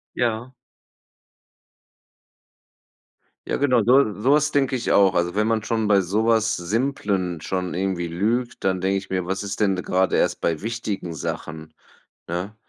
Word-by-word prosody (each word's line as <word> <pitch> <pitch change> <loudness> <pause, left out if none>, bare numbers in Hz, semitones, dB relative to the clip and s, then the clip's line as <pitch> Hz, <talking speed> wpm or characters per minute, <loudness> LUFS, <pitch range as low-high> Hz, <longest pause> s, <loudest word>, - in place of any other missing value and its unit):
Ja. 120 +1 -1 3.0
Ja, - - 0
genau, 130 -4 +3
so 125 0 +4
so 130 +6 +3
was 150 0 +3
denke 135 -2 +1
ich 120 - -1
auch. 95 -2 +5
Also, 85 0 0
wenn 105 +1 +1
man 110 -1 +1
schon 110 -1 -1
bei 100 -2 +4
sowas 110 +4 +1
Simplen 100 - -1
schon 90 +1 -3
irgendwie 90 -1 -2
lügt, 110 +9 -1
dann 95 -1 0
denke 95 +1 +1
ich 95 0 -9
mir, 95 -1 -1
was 95 +2 -3
ist 100 0 -5
denn 100 -2 +3
grade 90 0 +1
erst 90 0 0
bei 80 -2 0
wichtigen 105 -6 -4
Sachen, 80 +1 -6 0.6
ne? 90 +5 -4
100 Hz, 150 wpm, -23 LUFS, 90-115 Hz, 3.0 s, auch